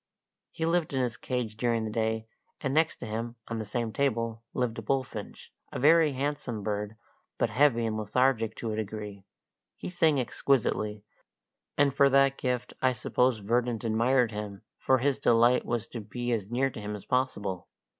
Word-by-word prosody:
He 160 - -3
lived 165 -2 +1
in 130 - +2
his 120 -2 -2
cage 120 -2 -3
during 115 -1 +1
the 110 - -4
day, 110 0 -1 0.3
and 135 -1 -2
next 160 +2 +3
to - - -8
him, 115 +2 -4
on 115 -1 -3
the 110 - -3
same 115 +1 -2
table, 115 -4 0
lived 120 -3 -1
a - - -4
bullfinch 130 -2 -4 0.2
a - - -4
very 155 +2 +5
handsome 135 -5 -3
bird, 105 0 -3 0.4
but 115 - +1
heavy 120 -1 +3
and 110 -1 -1
lethargic 115 +1 +1
to 115 - -4
a - - -2
degree; 105 -2 -5 0.5
he - - -6
sang 160 -5 +3
exquisitely, 110 -5 0 0.7
and 140 -1 +4
for 140 0 +5
that 135 0 +4
gift 125 -2 -2
I 130 -1 +3
suppose 125 0 +1
Verdant 120 +2 0
admired 115 +2 +2
him, 105 -2 -6 0.2
for 130 - +3
his 140 +2 +1
delight 120 0 +4
was 120 -1 -1
to 115 - -6
be 120 +3 -4
as 105 -4 -1
near 130 +3 +1
him 105 -1 -5
as 105 - -10
possible. 100 -8 -1
120 Hz, 175 wpm, -29 LUFS, 110-130 Hz, 0.7 s, very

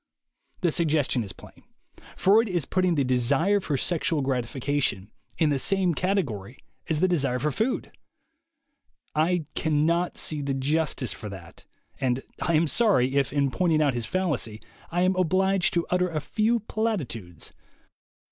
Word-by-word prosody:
The 175 -3 +2
suggestion 150 -7 +1
is 100 - -6
plain. - - -15 0.6
Freud 215 +4 +4
is 175 -6 0
putting 185 +1 +1
the 140 - +2
de 125 -1 +1
sire 160 +12 +3
for 150 -7 -2
sexual 160 +1 0
gratification 130 -4 -1 0.3
in 155 -2 +2
the 140 - +1
same 190 +2 +2
category 140 - -2 0.3
as 155 -1 +1
the 185 - +4
desire 140 -8 +1
for 150 +4 -1
food. 225 - -2 1.2
I 160 +1 +1
cannot 160 +3 +1
see 150 -2 0
the 140 -1 -2
justice 135 - 0
for 105 - -8
that; 85 -4 -11 0.3
and 130 -1 0 0.2
I 170 - +1
am 160 +2 +4
sorry, 155 - +2
if, 140 -3 +1
in 140 -1 +1
pointing 165 -2 +1
out 145 -3 +2
his 120 -2 -3
fallacy, 150 - -1 0.3
I 175 +1 0
am 185 +1 +2
obliged 185 +1 +2
to 170 - +1
utter 180 0 +2
a 160 -2 -2
few 220 +9 0
platitudes. 150 - -4
155 Hz, 155 wpm, -26 LUFS, 130-180 Hz, 1.2 s, Freud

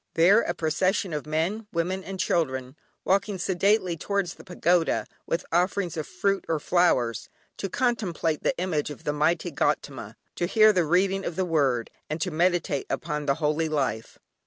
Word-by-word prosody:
There 190 +7 +6
a 175 - -2
procession 185 +3 0
of 150 0 -4
men, 175 +8 -1
women, 180 +3 -1
and 190 0 -7
children 130 -8 -1 0.3
walking 195 +1 +1
sedately 185 0 +1
towards 195 +1 -2
a - - -11
pagoda, 175 -1 +1 0.2
with 165 - -1
offerings 180 +1 +1
of 155 -2 -4
fruit 195 -1 0
or 160 -2 +1
flowers; 135 -9 +1 0.3
to 195 - -3
contemplate 180 - -1
the - - 0
image 170 -5 -1
of 145 - -9
the 150 - -1
mighty 165 +3 +1
Gaudama, - - -2 0.2
to 175 - 0
hear 215 +2 +6
the 180 -3 +2
reading 190 +4 +2
of 170 - -4
the 185 - 0
Word, 140 -8 +1 0.2
and 155 +2 -3
to 180 +3 -1
meditate 170 -3 +1
upon 150 -2 -3
the 140 - +3
Holy 155 +1 0
Life. 135 -7 -2
170 Hz, 170 wpm, -26 LUFS, 155-190 Hz, 0.3 s, There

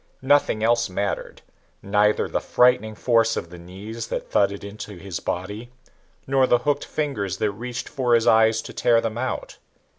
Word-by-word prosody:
Nothing 135 -5 +3
else 120 -1 +2
mattered 100 +2 -4 0.4
neither 105 +1 +2
the - - -2
frightening 115 -3 +2
force 115 -1 +2
of 85 - -5
the 90 - -10
knees 105 +6 -8
that - - -5
thudded 100 0 +1
into 100 0 -8
his 90 -1 -6
body 105 +7 -5 0.5
nor 135 -1 +3
the 120 - +4
hooked 145 -1 +1
fingers 105 - -3
that 105 0 0
reached 120 +4 -6
for 125 -4 +1
his 115 0 +2
eyes 110 0 +4
to - - -9
tear 115 -1 +3
them 115 0 -3
out. 130 +1 -4
110 Hz, 170 wpm, -23 LUFS, 100-120 Hz, 0.5 s, the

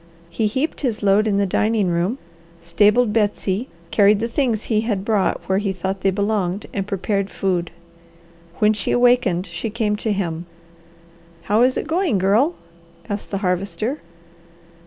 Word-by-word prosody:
He 215 +6 0
heaped 265 +9 -2
his 230 -7 -2
load 205 +2 +4
in 200 -2 +1
the 200 - +2
dining 210 0 +1
room, 175 +8 0 0.4
stabled 210 +7 +3
Betsy, 210 +1 0 0.2
carried 205 0 +4
the 230 - -1
things 235 -3 0
he 215 -2 +1
had 205 -4 -2
brought 215 -3 0
where 190 0 +2
he 200 -1 -1
thought 190 +1 -4
they 195 - +3
belonged, 200 -1 -1
and 195 -1 -3
prepared 200 0 -1
food. 180 -3 -1 0.9
When 210 +3 +3
she 210 -2 -3
awakened 245 -8 +3
she 180 +5 -5
came 215 -1 -1
to 220 +1 -2
him. 175 -4 -3 1.0
"How 210 +7 +2
is 255 +1 +3
it - - -2
going, 330 - +1
Girl?" 215 - +2 0.5
asked 205 0 -4
the 200 - -2
Harvester. 195 - -2
205 Hz, 155 wpm, -21 LUFS, 190-225 Hz, 1.0 s, load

